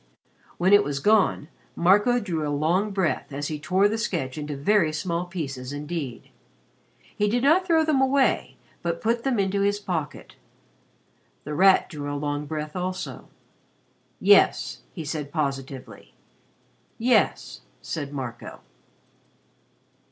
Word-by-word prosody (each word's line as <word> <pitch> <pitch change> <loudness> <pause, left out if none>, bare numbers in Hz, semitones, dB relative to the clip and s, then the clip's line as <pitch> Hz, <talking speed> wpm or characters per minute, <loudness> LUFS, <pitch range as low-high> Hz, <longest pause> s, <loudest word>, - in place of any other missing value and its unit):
When 185 +3 +3
it 205 0 +7
was 145 -5 -3
gone, 200 -3 +2 0.3
Marco 205 +8 +4
drew 180 -8 -3
a 150 - -2
long 165 +8 +1
breath 185 -9 -1
as 145 +1 -4
he 155 -1 -4
tore 185 +6 +2
the 220 +2 -2
sketch 150 - -2
into 150 -2 -5
very 170 +2 +2
small 170 +3 -2
pieces 140 -7 -5
indeed. 145 -3 -6 0.8
He 210 0 +1
did 240 +3 0
not 340 +6 +4
throw 325 -2 +3
them 300 -4 +2
away 265 0 +1 0.2
but 170 -1 -2
put 230 +1 0
them 265 -3 0
into 200 0 0
his 200 +1 +2
pocket. 170 -7 -5 1.1
The 150 - -5
Rat 190 +5 +5
drew 145 -3 -6
a 145 - -3
long 145 0 -3
breath 150 0 -5
also. 185 0 -5 0.9
"Yes," - - +4
he 165 -4 -7
said 145 -1 -4
positively. 135 -4 -5 0.8
"Yes," 245 +2 +1 0.2
said 145 -4 -4
Marco. 125 -5 -7
170 Hz, 135 wpm, -25 LUFS, 145-205 Hz, 1.1 s, it